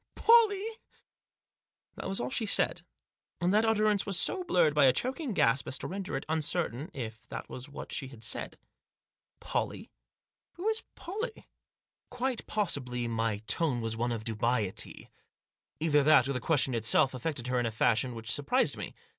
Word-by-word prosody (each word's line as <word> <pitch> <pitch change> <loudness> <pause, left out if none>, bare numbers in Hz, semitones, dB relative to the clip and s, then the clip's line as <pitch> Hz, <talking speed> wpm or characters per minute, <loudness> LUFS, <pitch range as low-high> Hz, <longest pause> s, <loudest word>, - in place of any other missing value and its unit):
" - - -52
Pollie 455 -3 +5
I" 450 -1 -8 1.2
That - - -5
was 195 - -3
all 125 +1 -3
she 220 - -1
said; - - +2 0.6
and 175 +2 +1
that 215 +2 +4
utterance 215 -2 +2
was 195 -3 +2
so 375 - +3
blurred 175 - +3
by 145 -2 +5
a 130 - +6
choking 265 - -2
gasp 135 - +2
as 130 - -1
to - - -7
render 185 -6 -4
it 135 - -6
uncertain 160 -2 0
if 110 -4 -7
that - - -7
was 130 +3 -7
what 145 - -9
she 135 - -3
had 120 -4 -13
said. 115 - -4 0.8
"Pollie? - - -3 0.6
Who 360 +5 -5
is 445 0 -1
Pollie?" 435 +6 -6 0.6
Quite 250 -1 -3
possibly 130 - -1
my 115 -2 -1
tone 125 +3 +1
was 115 -1 -2
one 120 +2 -1
of 115 -2 -3
dubiety. 110 -2 -2 0.7
Either 150 -2 +3
that 140 -3 +5
or 140 - -1
the 125 - -2
question 135 -2 +2
itself 115 +4 +3
affected 130 0 -4
her 125 0 0
in 120 - 0
a - - -3
fashion 115 +2 +1
which 115 -2 -2
surprised 145 - +2
me. - - -6
145 Hz, 175 wpm, -30 LUFS, -, 1.2 s, a